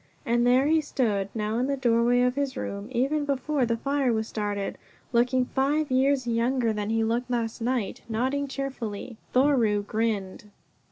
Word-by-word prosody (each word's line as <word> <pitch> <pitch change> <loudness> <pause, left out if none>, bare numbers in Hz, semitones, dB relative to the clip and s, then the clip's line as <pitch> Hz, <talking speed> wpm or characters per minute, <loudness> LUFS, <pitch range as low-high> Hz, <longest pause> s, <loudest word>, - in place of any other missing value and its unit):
And 240 +1 +2
there 255 +2 +4
he 315 +1 +3
stood 215 -9 -1
now 215 +1 -1
in 255 - +1
the 280 0 -1
doorway 240 -1 +3
of 250 0 +2
his 275 -1 -2
room, 200 +1 -4
even 275 +5 +1
before 280 -1 0
the 230 0 0
fire 275 0 0
was 220 -1 -1
started 205 -2 -3 0.3
looking 250 +2 +3
five 280 +3 0
years 265 0 +2
younger 235 0 +1
than 210 0 -3
he 225 0 +1
looked 235 +3 -1
last 235 -1 -2
night, 240 -3 -1
nodding 260 +5 0
cheerfully. 255 -5 -5
Thoreau 245 -6 +3
grinned. 210 -3 -2
245 Hz, 165 wpm, -26 LUFS, 225-270 Hz, 0.3 s, there